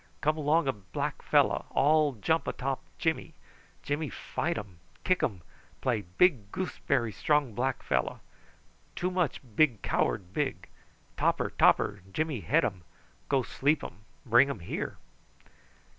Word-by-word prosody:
Come 155 +1 +2
along 155 +1 +2
a 135 - +2
black 100 -2 -4
fellow. - - +2
All 150 0 +3
jump 160 +8 0
atop 135 0 -2 0.2
Jimmy. 160 -1 -1 0.5
Jimmy 145 +1 -2
fight 170 +1 -3
um, 100 -5 -8 0.2
kick 185 -1 +2
um 95 -7 -1 0.4
play 120 -5 0
big 105 - +2
goose 185 -7 -4
berry 120 -5 +2
strong 150 -1 +1
black 130 +4 -1
fellow. 65 -3 0 0.8
Too 180 +1 -1
much 180 -5 0
big 125 -10 +3
coward 95 -1 0
big. 145 +1 -2 0.5
Topper, - - +1
topper, 100 - +3
Jimmy 155 0 -1
head 145 - +2
um. 95 -5 -3 0.5
Go 135 -2 +2
sleep 145 +5 +1
um. 90 - -7 0.3
Bring 120 +3 +5
um 130 -9 -4
here." 85 - -4
135 Hz, 140 wpm, -29 LUFS, 105-155 Hz, 0.8 s, Bring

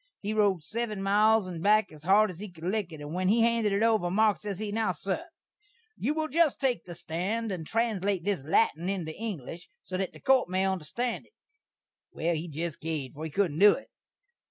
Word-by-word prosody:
He 210 +1 -3
rode 200 -6 +2
seven 215 +3 -3
miles 210 +1 +4
and 170 -3 -6
back 215 +1 +3
as 155 -1 -13
hard 200 +5 +4
as 175 - -12
he 210 0 -6
could 165 -2 -15
lick 190 0 -1
it, 155 -2 -9
and 145 +1 -7
when 185 +1 0
he 225 +4 +4
handed 230 -2 +2
it 200 +2 +1
over, 220 -6 +2
Marks, 210 +2 +2
ses 205 -3 -4
he, 210 0 -4
"Now, 220 0 0
sur, 195 - -3 0.7
you 290 +7 -1
will 315 0 -1
just 315 0 +2
take 260 -4 0
the 175 -1 -8
stand 200 +9 -2
and 165 -4 -5
translate 205 -5 0
this 200 -8 -1
lattin' 165 +2 +2
into 175 -5 -3
English, 175 - -6
so 185 - -4
that 190 -1 -2
the - - -14
court 265 -6 +3
may 185 +1 +1
onderstand 190 - -2
it." - - -32 0.8
Well, 170 +2 -1
he 165 +2 -3
jest 160 0 -4
caved, 155 -5 -3
for 155 +2 -6
he - - -4
couldn't 165 -2 0
do 205 0 +8
it. - - -8
195 Hz, 215 wpm, -28 LUFS, 170-220 Hz, 0.8 s, do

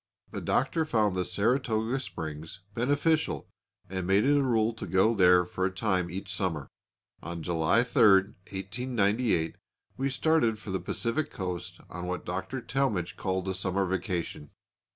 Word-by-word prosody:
The - - -5
Doctor 160 +5 +1
found 110 -10 +1
the 90 - +1
Saratoga 110 +5 0
Springs 80 - -7
beneficial 145 +7 +1 0.4
and 95 -1 -4
made 100 +2 +4
it 145 +1 +4
a 145 - +4
rule 115 -4 +2
to 110 - -7
go 95 +6 +3
there 90 -3 +5
for 90 +1 -4
a 95 - +3
time 95 -2 0
each 95 +3 -5
summer. 80 -7 -2 0.5
On 85 0 -6
July 85 +7 +2
3, 125 - 0 0.5
1898, 105 -2 0 0.4
we 135 +1 0
started 135 -4 +2
for 105 -2 -8
the 95 - -1
Pacific 115 +10 -1
coast 90 -3 -5
on 90 +1 -6
what 90 0 -3
Dr. 95 +8 -3
Talmage 120 -9 -1
called 95 0 -2
a 95 - 0
summer 95 +1 0
vacation. 90 -5 -3
100 Hz, 150 wpm, -29 LUFS, 90-120 Hz, 0.5 s, there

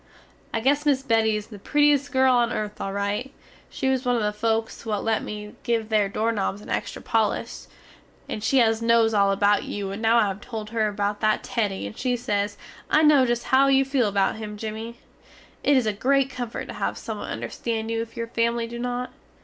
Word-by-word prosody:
I 225 - -1
guess 285 +4 +2
miss 280 -3 +2
Betty 225 -4 +2
is 210 -1 -4
the 210 -3 -10
prettiest 290 +4 +2
girl 260 -1 +4
on 240 -1 +2
earth 210 -2 -4
al 195 - -3
rite. 205 +6 -2 0.3
She - - -3
was 260 -1 +1
one 245 -1 +1
of 230 - 0
the 210 0 0
folks 225 +1 -1
what 215 -3 -2
let 225 -1 +1
me 210 0 -7
give 225 -2 -1
there 210 -3 +2
dorenobs 210 -1 -1
a - - -11
extra - - -3
polish, - - -1 0.6
and 210 - -5
she 270 - +2
nos 230 0 +3
all 200 -1 +4
about 205 +1 +2
you 200 -1 -4
and 200 +3 -6
now 225 +1 +4
I 225 - +5
have 195 +1 -6
tole 220 -2 -6
her 220 0 0
about 205 0 -2
that 215 -1 +2
Teddy, 205 - -2
and 100 - -7
she 250 -1 -1
sez, 205 -3 -2 0.3
I 310 - +4
no 290 -4 +6
just 240 0 0
how 270 +1 +4
you 270 0 +4
feel 265 -4 +1
about 200 +1 +1
him 210 -1 -6
Jimmy. 220 +2 -6 0.7
It 285 -1 +4
is 255 - +2
a 215 - +1
grate 270 +5 +2
comfort 245 -3 -5
to - - -5
have - - -2
someone - - -6
understand 225 -1 -3
you 225 0 0
if 230 +1 -8
your 230 - -2
family 230 0 0
do 235 +1 -7
not. 245 +1 -3
225 Hz, 215 wpm, -24 LUFS, 210-250 Hz, 0.7 s, no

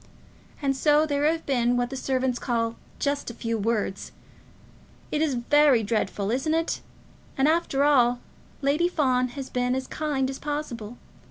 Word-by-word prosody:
And 270 -1 +1
so 295 +3 +4
there 290 -1 0
have 325 +1 +1
been 245 -3 +2
what 245 +1 -1
the - - -4
servants 260 -1 -1
call 230 -2 -1 0.2
'just 285 -2 -1
a 235 - -8
few 230 -1 -2
words.' 215 -2 -2 1.0
It 300 - 0
is 305 -5 +1
very 265 0 +4
dreadful, 205 -1 -1
isn't 290 +6 0
it? 330 +1 -1 0.6
And, 270 +2 +3
after 310 -4 +2
all, 245 -4 +4 0.4
Lady 295 +5 +3
Fawn 255 -7 +1
has 270 -1 -6
been 250 0 0
as 265 0 -2
kind 290 -3 -1
as 270 - -7
possible. 245 -7 -5
265 Hz, 160 wpm, -26 LUFS, 240-295 Hz, 1.0 s, so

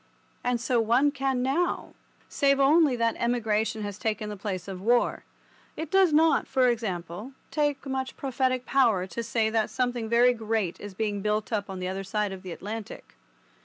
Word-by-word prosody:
And 245 -1 0
so 235 0 +1
one 245 +6 +3
can 270 -2 -1
now, 315 +7 -1 0.3
save 275 -1 +2
only 290 0 +5
that 230 -1 +1
emigration 220 -2 0
has 205 0 -5
taken 215 -1 -2
the 210 - -5
place 190 -2 -5
of 190 -2 -6
war. 240 +4 +2 0.5
It 320 -1 -5
does 385 -3 +5
not, 315 -1 +4
for 255 -1 +3
example, 205 0 -4 0.2
take 290 -2 0
much 265 -1 -3
prophetic 255 -1 -1
power 230 -9 +3
to 210 +5 -5
say 225 -1 0
that 220 -1 +1
something 245 -3 -1
very 240 +2 +5
great 220 -5 -2
is 205 -2 -9
being 205 -1 -2
built 210 +2 -1
up 205 -2 -1
on 190 - -5
the 180 0 -3
other 190 +1 -3
side 205 +1 -1
of 190 -1 -7
the 185 -2 -8
Atlantic. 210 +5 -7
230 Hz, 180 wpm, -27 LUFS, 205-265 Hz, 0.5 s, only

